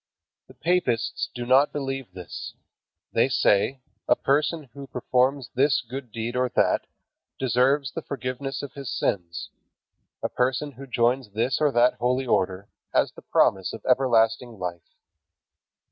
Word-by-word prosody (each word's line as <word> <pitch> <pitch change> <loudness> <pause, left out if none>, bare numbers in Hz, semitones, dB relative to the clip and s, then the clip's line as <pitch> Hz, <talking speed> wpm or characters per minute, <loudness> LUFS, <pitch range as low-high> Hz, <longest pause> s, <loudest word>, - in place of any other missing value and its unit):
The - - -16
papists 135 -9 0
do 120 -1 -4
not 130 +4 +5
believe 135 -3 -4
this. 90 -2 -8 0.6
They - - +3
say, 125 +6 +2 0.3
"A - - +5
person 150 +3 +1
who 140 0 -9
performs 130 +1 0
this 135 +2 +3
good 130 -1 -7
deed 115 +2 -4
or 125 0 +1
that, - - +2 0.5
deserves 130 +2 +2
the - - -5
forgiveness 135 +1 -4
of 140 - -7
his 140 -3 -6
sins. 85 -3 -2 0.7
A - - +2
person 130 +3 0
who 135 +1 -11
joins 125 0 +1
this 115 +7 0
or 150 -2 +4
that 120 +1 +4
holy 125 +2 +1
order, 95 -4 0 0.2
has - - +2
the - - -13
promise 95 -1 +2
of 115 - -9
everlasting 120 -2 +2
life." 85 -2 -6
125 Hz, 145 wpm, -25 LUFS, 115-135 Hz, 0.7 s, not